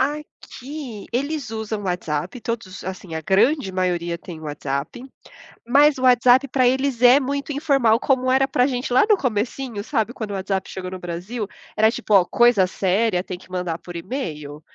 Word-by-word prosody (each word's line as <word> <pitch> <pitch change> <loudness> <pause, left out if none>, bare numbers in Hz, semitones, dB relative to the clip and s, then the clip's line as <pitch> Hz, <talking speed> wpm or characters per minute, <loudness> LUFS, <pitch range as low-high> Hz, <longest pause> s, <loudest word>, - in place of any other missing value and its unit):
Aqui 280 -3 -5
eles 280 0 -2
usam 220 -1 -4
WhatsApp, 180 +3 -3
todos 220 -6 -5
Assim, 185 -3 -6
a - - -3
grande 200 - +2
maioria 175 -2 -1
têm 170 -2 -10
WhatsApp, 145 - -4 0.6
mas 285 +4 +5
o - - -6
WhatsApp 255 +1 +5
pra 255 -1 +3
eles 260 -1 0
é 250 +1 +8
muito 280 +1 -2
informal 275 -7 +3
como 255 +1 +1
era 265 +1 +4
pra 250 -1 +2
gente 250 -2 -3
lá 250 - +5
no 425 - +7
comecinho, 235 - -2
sabe, 235 -4 -1
quando 220 -5 -6
o - - -4
WhatsApp 190 0 -2
chegou 185 -1 -6
no 185 - -6
Brasil, 180 +6 -5 0.3
era 220 +1 +5
tipo: 220 - -3
"Ó, 190 -3 +6
coisa 235 -3 +4
séria 190 +1 0
tem 180 -1 -6
que 185 - -18
mandar 180 -3 -3
por 175 +1 -10
e-mail, 155 - -5
220 Hz, 175 wpm, -22 LUFS, 185-260 Hz, 0.6 s, é